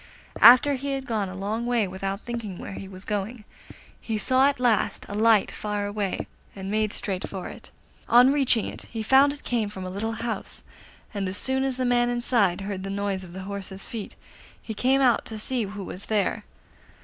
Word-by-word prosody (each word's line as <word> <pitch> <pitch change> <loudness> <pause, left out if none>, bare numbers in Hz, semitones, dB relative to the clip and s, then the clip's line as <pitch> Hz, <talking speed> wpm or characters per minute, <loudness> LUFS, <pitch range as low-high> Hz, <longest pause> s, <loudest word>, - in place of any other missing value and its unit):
After 255 +4 +9
he 275 +1 -3
had 270 -1 -3
gone 215 -5 -1
a 185 - -8
long 215 +5 -3
way 235 -4 +2
without 195 +2 -4
thinking 230 -6 -5
where - - -7
he 195 - -7
was 190 0 -10
going, 210 +2 -3 0.6
he 220 -2 -2
saw 260 +5 +4
at 285 -3 0
last 225 -5 +1
a - - -7
light 220 -1 +4
far 210 -1 -3
away, 205 -1 -2 0.3
and 195 0 -5
made 215 0 +1
straight 190 -3 -3
for 190 -2 -6
it. - - -11 0.4
On 250 +3 +7
reaching 265 -6 +3
it - - -7
he 225 -2 -4
found 270 +5 +5
it 290 - -9
came 225 -4 -1
from 190 -2 -7
a 185 - -5
little 220 +4 -2
house, 230 0 -5 0.5
and 200 -2 -2
as 185 +2 -2
soon 265 +3 +1
as 265 -2 -1
the 255 - 0
man 240 0 +3
inside 235 -6 +1
heard 195 -1 -4
the 195 - -5
noise 200 -1 -2
of 175 -1 -11
the 190 +1 -7
horse's 195 0 -7
feet 225 -3 -7 0.4
he 220 - -6
came 260 +5 +2
out 250 -3 +4
to 220 - -6
see 235 +1 -1
who 200 0 -7
was 185 +1 -7
there. 210 -3 0
215 Hz, 210 wpm, -25 LUFS, 195-245 Hz, 0.6 s, After